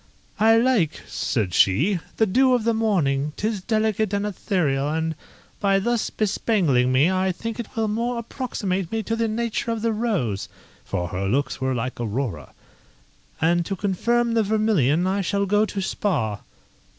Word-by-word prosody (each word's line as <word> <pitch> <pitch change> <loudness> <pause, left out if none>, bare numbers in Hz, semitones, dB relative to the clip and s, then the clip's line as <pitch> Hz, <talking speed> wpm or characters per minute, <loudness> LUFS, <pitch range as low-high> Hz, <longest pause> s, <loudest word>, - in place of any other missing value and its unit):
"I 225 +1 +6
like," 230 - +2
said 105 -8 -2
she, 150 - +3 0.2
"the 220 - +4
dew 255 +6 +4
of 240 - -1
the 230 +1 +2
morning, 150 -11 +1
'tis 215 -2 -2
delicate 215 -1 0
and 200 +1 -1
ethereal, 160 -8 0
and, 160 +1 -1 0.5
by 195 -1 +3
thus 235 +3 0
bespangling 185 - +1
me, 140 +8 +4
I 190 0 +1
think 230 +5 -6
it 235 - -7
will 225 -1 0
more 235 +3 -1
approximate 205 -7 -3
me 225 -1 -1
to 225 - -1
the 230 0 0
nature 230 +1 -2
of 230 -1 -2
the 230 - +2
rose 195 - -1 0.3
[for 90 -1 -3
her 95 +2 -2
looks 135 +5 -1
were 130 0 0
like 125 +1 -3
Aurora]; 115 - -3 0.9
and 170 +2 +2
to 195 - -2
confirm 235 +5 0
the 230 - +3
vermilion 200 - +2
I 195 +2 0
shall 200 +2 0
go 210 +2 +2
to 200 - -4
Spa." 135 - -1
195 Hz, 165 wpm, -23 LUFS, 145-225 Hz, 0.9 s, I